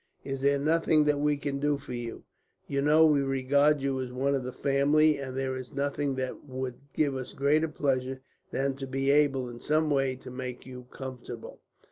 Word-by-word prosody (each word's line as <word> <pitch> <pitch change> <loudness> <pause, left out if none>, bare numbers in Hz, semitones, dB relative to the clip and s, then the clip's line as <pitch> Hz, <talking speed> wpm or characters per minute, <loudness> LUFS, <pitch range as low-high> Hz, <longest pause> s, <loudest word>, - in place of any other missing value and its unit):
"Is 135 -1 -4
there 140 +1 +3
nothing 155 +1 +3
that 150 -1 +2
we 145 0 +2
can 140 -1 -3
do 145 0 +1
for 140 -2 -9
you? 120 -1 -5 0.4
You 140 -1 0
know 155 +3 +6
we 150 -3 +4
regard 140 +2 +2
you 135 -1 0
as 125 -1 -5
one 135 +3 0
of 135 - 0
the 125 - -4
family, 145 +3 +3
and 130 -1 -5
there 135 -1 -1
is 130 -1 -7
nothing 140 0 -1
that 130 -1 -4
would 130 -2 -5
give 145 -2 +1
us 130 -1 -5
greater 150 +3 +2
pleasure 135 -3 -1 0.3
than 135 0 -1
to 135 -1 -5
be 135 +1 +1
able, 140 -3 +3
in 120 -1 -8
some 155 +2 +1
way, 135 -2 +1
to 130 - -11
make 125 -1 -6
you 125 -1 -10
comfortable." 130 -4 -8
135 Hz, 200 wpm, -29 LUFS, 130-145 Hz, 0.4 s, know